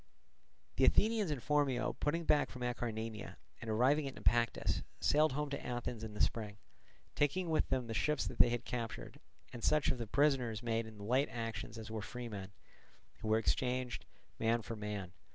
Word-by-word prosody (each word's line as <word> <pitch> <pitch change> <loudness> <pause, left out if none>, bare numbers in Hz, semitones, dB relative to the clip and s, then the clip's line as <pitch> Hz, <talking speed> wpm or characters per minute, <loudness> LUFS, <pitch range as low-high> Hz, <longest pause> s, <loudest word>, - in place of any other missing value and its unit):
The - - +5
Athenians 215 -4 +4
and 145 -5 -3
Phormio 145 -4 +2
putting 165 +3 0
back 145 -1 +4
from 125 -2 -7
Acarnania 115 -3 -3 0.3
and 115 - -5
arriving 135 +7 +3
at 135 - -6
Naupactus, 120 -1 +2 0.2
sailed 150 -1 +4
home 150 +1 -2
to 140 - -3
Athens 120 -2 -3
in 110 -1 -6
the - - -1
spring, 105 -2 0 0.6
taking 165 +4 +1
with 155 - +2
them 130 -2 +1
the 115 - -4
ships 150 +5 +1
that - - -5
they - - +7
had 120 -1 -2
captured, 115 -2 -5 0.3
and 120 - -7
such 150 -2 +3
of 125 - -2
the 115 - -3
prisoners 125 -4 +2
made 115 -1 0
in 110 -1 -11
the 100 - -8
late 130 +7 +2
actions 115 -1 -4
as 110 0 -7
were 110 -1 -3
freemen; 105 -2 -6 0.7
who 110 - -5
were 110 0 +4
exchanged, 125 +2 0 0.3
man 115 +1 +2
for 115 +2 -5
man. 105 -4 -4
120 Hz, 185 wpm, -35 LUFS, 110-140 Hz, 0.7 s, they